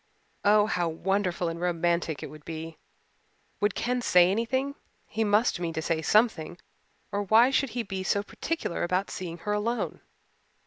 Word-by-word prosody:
Oh, 210 0 +5
how 175 -5 0
wonderful 180 +1 -1
and 165 +1 -4
romantic 170 -3 0
it - - -7
would 155 -1 -12
be! 160 0 -7 0.8
Would 205 -1 +1
Ken 250 +1 -1
say 180 -5 +5
anything 260 +6 0 0.3
he 225 - -2
must 210 -1 +2
mean 170 -2 -2
to 160 - -2
say 160 -1 0
something 175 -3 +2 0.5
or 205 - -1
why 225 +6 +5
should 275 0 +2
he 240 - 0
be 195 -2 -4
so 200 +2 0
particular 325 - -3
about 185 +3 0
seeing 170 -2 -5
her 210 - 0
alone? 230 +3 -2
190 Hz, 165 wpm, -28 LUFS, 170-220 Hz, 0.8 s, Oh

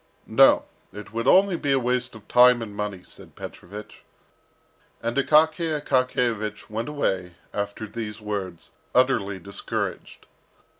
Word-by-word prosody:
"No, - - +5 0.3
it 105 +2 -10
would 115 0 -2
only 190 -1 +5
be 145 -4 -1
a 135 - +4
waste 125 -1 -1
of 110 - -14
time 125 -1 +6
and 105 -2 -9
money," 105 -3 -4
said - - -14
Petrovich. 105 +4 -10 1.0
And 115 0 -3
Akaky 155 +2 +3
Akakiyevich 125 -7 -1
went 115 +6 -3
away 95 -12 -2 0.2
after 105 +1 -3
these 110 0 -6
words, 100 -5 -5 0.2
utterly 115 -7 +2
discouraged. 100 +2 -5
115 Hz, 130 wpm, -24 LUFS, 105-130 Hz, 1.0 s, time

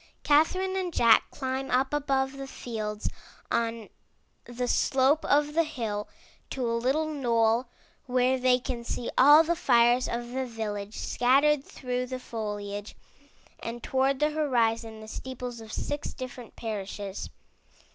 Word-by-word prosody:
Catherine 370 +6 +3
and 370 -2 -1
Jack 235 -7 +5
climb 265 -1 -3
up 265 +3 +1
above 270 -2 +1
the 275 0 -6
fields 215 -5 -4 0.4
on 235 0 +2
330 230 0 -6
IN - - -18
THE - - -22
NURSERY 240 - -12
the 250 0 0
slope 275 +3 +3
of 295 +1 +2
the 330 +1 +3
hill 225 -9 -4 0.4
to 260 -2 -3
a 230 - 0
little 260 +7 +1
knoll 240 -5 +1 0.4
where 255 +1 +2
they 250 0 +4
can 250 -1 -5
see 235 0 -4
all 295 +4 +8
the 340 +1 0
fires 240 -3 +4
of 240 0 -4
the 260 0 -2
village 210 -3 -5
scattered 275 +4 +3
through 250 -2 -4
the 255 0 -4
foliage, 205 -3 -5 0.6
and 235 +1 -6
toward 265 +1 +1
the 300 +1 +2
horizon 230 -7 0
the 215 - -10
steeples 245 0 -6
of 220 -1 -10
six 290 +5 -4
different 255 -3 -8
parishes. 205 -3 -5
250 Hz, 155 wpm, -28 LUFS, 230-275 Hz, 0.6 s, all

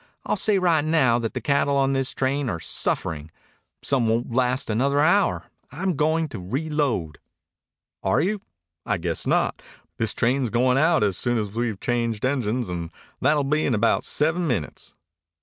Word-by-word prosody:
I'll - - 0
say 210 0 +2
right 170 -5 +3
now 145 -7 +3
that 115 -2 -4
the - - -2
cattle 140 0 +1
on 135 0 +2
this 135 -1 0
train 135 0 -1
are 85 - -3
suffering. 80 -1 -2 0.5
Some 125 -5 +2
won't 115 +2 0
last 130 +2 +1
another 135 +6 +1
hour. 180 +7 +2 0.2
I'm 180 +4 -2
goin' 160 +2 +1
to 115 - -7
reload." 125 - -2 0.8
"Are 95 - +2
you? 195 +5 0 0.4
I 105 - -1
guess 85 -1 -3
not. - - +1 0.4
This 110 - 0
train's 125 +1 +1
going 125 +3 +2
out 160 -3 +3
soon 120 +6 -1
as 105 -3 -2
we've 115 -3 -2
changed 115 -2 -1
engines, 125 -3 0
and 85 -2 -4 0.3
that'll 145 +2 +2
be 150 +3 +1
in 125 - +1
about 115 +2 +2
seven 160 +3 0
minutes." 105 - -4
130 Hz, 165 wpm, -24 LUFS, 115-150 Hz, 0.8 s, right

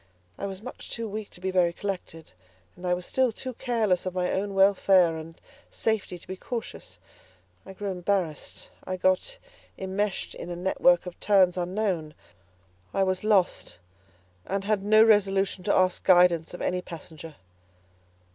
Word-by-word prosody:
I 200 - -4
was 195 +1 -8
much 255 - -9
too 230 -1 -4
weak 210 0 -6
to - - -13
be 190 +1 -2
very 180 -2 +3
collected, 175 -4 -6 0.4
and 180 - -7
I 180 - +3
was 180 0 -6
still 260 -2 +1
too 255 +3 -7
careless 220 -8 0
of 185 - -4
my 180 -1 0
own 195 +1 -2
welfare 190 -3 +4
and 160 +1 -9 0.3
safety 220 -5 -1
to 175 - -18
be 190 - -5
cautious; 230 +4 -7 0.7
I 195 - -8
grew 200 +1 -4
embarrassed; 180 -4 -3
I 185 - -4
got 185 - +1 0.4
immeshed 195 +1 -2
in - - -8
a 175 - -4
network 180 -1 +3
of 180 - -9
turns 190 -4 +4
unknown. 180 -3 -2 0.8
I 195 - +3
was 185 0 -1
lost 205 -4 +1 0.7
and 195 0 -2
had 210 -1 0
no 215 +2 +6
resolution 195 -3 +2
to 200 - +2
ask 185 -1 +2
guidance 175 -2 +4
of - - -6
any 180 0 0
passenger. 160 -2 -10
190 Hz, 160 wpm, -27 LUFS, 180-205 Hz, 0.8 s, no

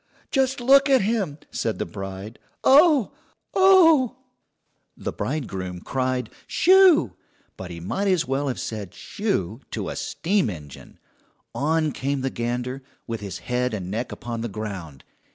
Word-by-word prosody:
"Just 265 -1 +1
look 275 +3 +5
at 265 -1 +5
him!" 195 -8 -1
said - - -2
the - - -2
bride. 95 +4 -8 0.2
"Oh, 290 - +6 0.4
oh!" 330 - +6 0.8
The - - -4
bridegroom 95 - -4
cried 130 -2 -2 0.2
"Shoo!" 365 - +5 0.4
but 95 - -8
he 85 -1 -7
might 190 - -2
as 180 -4 +2
well 135 +2 -1
have 130 - -2
said 105 -5 -6
"Shoo" 120 - -2
to - - -4
a - - -5
steam 185 - 0
engine. 75 -7 -10 0.6
On 155 +1 +1
came 140 +1 -2
the 135 0 -2
gander, 125 +3 -3 0.2
with 115 -1 -4
his 100 -2 -6
head 125 -1 0
and 95 -2 -5
neck 115 +4 -3
upon 115 -1 -5
the 120 - -2
ground. 95 - -7
130 Hz, 145 wpm, -24 LUFS, -, 0.8 s, Oh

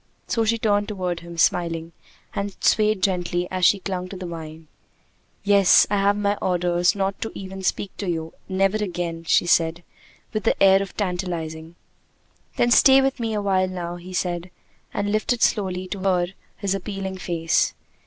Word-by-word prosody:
So 230 - 0
she 230 +1 +2
turned 205 -2 +1
toward 180 -4 -3
him 170 0 -10
smiling, 165 -1 +1 0.4
and 200 -1 -4
swayed 215 -3 +2
gently 175 -2 0
as 185 -1 +1
she 205 - +5
clung 185 -2 -4
to 190 - -7
the 185 - -6
vine. 160 -2 -8 0.8
"Yes; 200 -2 +6
I 205 - +2
have 200 +1 +2
my 205 0 0
orders 175 -1 +1
not 195 0 -2
even 190 0 -7
to - - -8
speak 190 +1 -2
to 200 - -3
you! 165 -1 -3 0.2
Never 195 +2 +2
again!" 175 -5 -4
she 165 - +3
said, 170 0 +2 0.5
with 215 -2 -2
the - - +1
air 195 0 +6
of 195 - -7
tantalizing. 170 -4 -4 0.8
"Then 240 - +2
stay 265 +2 +7
with 270 0 0
me 225 -2 -2
a 205 - -1
while 190 -2 +2
now," 175 -1 -5
he 180 +1 -11
said, 175 -1 -2 0.4
and 205 0 -2
lifted 215 +2 0
slowly 185 -3 0
to 200 - -4
her 185 -2 +2 0.3
his 200 -2 -1
appealing 195 -1 -5
face. 165 -2 0
185 Hz, 175 wpm, -23 LUFS, 175-200 Hz, 0.8 s, stay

